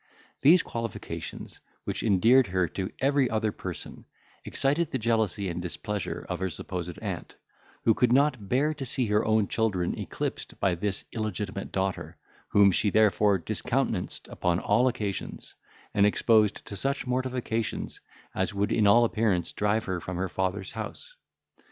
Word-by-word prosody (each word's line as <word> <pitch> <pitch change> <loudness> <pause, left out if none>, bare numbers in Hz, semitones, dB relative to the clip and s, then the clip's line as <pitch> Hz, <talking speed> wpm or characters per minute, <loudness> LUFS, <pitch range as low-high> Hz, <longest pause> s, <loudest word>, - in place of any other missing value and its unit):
These 165 +5 +7
qualifications, 115 -2 -6 0.2
which - - -3
endeared 115 +5 +5
her 95 -1 +1
to 95 +2 -4
every 135 -1 +2
other 110 -1 0
person, - - -8 0.4
excited 145 +5 0
the - - -1
jealousy 110 -4 0
and 90 0 -3
displeasure 95 +4 -4
of - - -3
her 95 0 -1
supposed 90 +1 -5
aunt, - - -5 0.5
who 115 - +5
could 120 +2 +2
not 130 -6 +2
bear 145 +5 +2
to 145 -2 -6
see 130 0 0
her 105 0 +2
own 110 -2 +2
children 100 -6 0
eclipsed - - -4
by 95 - +2
this 95 +3 -2
illegitimate 105 -3 -4
daughter, 95 0 -2 0.3
whom 100 -1 +5
she 100 +3 +2
therefore 105 -1 +4
discountenanced 85 - -2
upon 85 -1 0
all 120 +7 +3
occasions, 105 -7 -4 0.4
and 100 -1 +5
exposed 110 -1 +3
to 100 - -7
such 140 +7 0
mortifications 125 -3 -2 0.3
as - - -1
would 100 +2 0
in 105 -2 +3
all 120 +4 +6
appearance 105 -6 0
drive 105 +2 0
her 95 -2 -2
from 90 +2 -5
her 95 +1 -1
father's 95 +1 -2
house. 115 - -7
105 Hz, 150 wpm, -28 LUFS, 95-120 Hz, 0.5 s, These